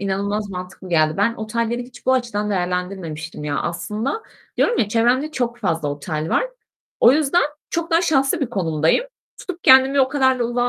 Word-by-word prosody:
inanılmaz 200 +1 -2
mantıklı 180 0 -8
geldi. 155 -1 +2
Ben 220 +4 +2
otelleri 230 +2 -2
hiç 245 +1 -15
bu 260 - +4
açıdan 230 -5 -1
değerlendirmemiştim 180 -4 -3
ya 145 -1 -1
aslında. 210 - -3 0.3
Diyorum 475 - +2
ya: 205 - +2
"Çevremde 245 +7 +2
çok 240 -4 -2
fazla 165 -6 -1
otel 155 +2 -4
var." - - +2 0.6
O 240 - +7
yüzden, 310 +3 +2 0.3
çok 335 +1 -2
daha 330 +2 +3
şanslı 295 0 +2
bir 275 - +1
konumdayım. 165 - +1 0.3
Tutup 360 -2 -8
kendimi 265 +1 +6
o 260 - +3
kadar 260 -2 +2
da 240 - 0
ulağa 245 +1 0
225 Hz, 175 wpm, -21 LUFS, 180-260 Hz, 0.6 s, O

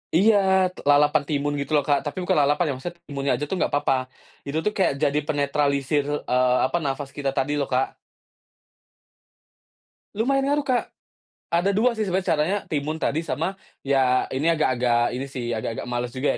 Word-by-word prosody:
Iya. 210 +6 +5 0.4
T - - -35
lalapan 145 +1 +4
timun 145 -1 -1
gitu 140 - -4
loh, 145 - +3
Kak. 145 -1 +3
Tapi 145 - -5
bukan 180 - +2
lalapan 145 +4 +2
ya, - - 0
maksudnya 170 +7 -7
timunnya 140 -1 -2
aja - - -4
tuh - - -1
enggak - - 0
apa-apa. 145 -1 +2 0.5
Itu 140 +2 -2
tuh 210 - +2
kayak 185 -7 +2
jadi 145 0 +2
penetralisir, 145 0 +1 0.2
eee, 125 0 +2
apa, 150 - 0
nafas 135 0 -3
kita 140 -1 -1
tadi 135 +2 0
loh, 140 - -1
Kak. 130 +1 0 2.2
Lumayan 270 +5 +1
ngaruh, 290 +1 +1
Kak. 255 -3 0 0.6
Ada 175 +4 +1
2 235 +3 +2
sih 215 - 0
sebenarnya 185 0 -1
caranya, 165 +5 +2
timun 155 +1 -2
tadi 160 +3 -1
sama 165 +5 -2 0.2
ya 130 -2 +2
ini 150 +6 +1
agak-agak 125 -5 +1
ini 135 - -3
sih 125 -3 -5
agak-agak 115 -1 -3
males 120 0 -3
juga 130 +2 0
145 Hz, 175 wpm, -24 LUFS, 135-170 Hz, 2.2 s, Iya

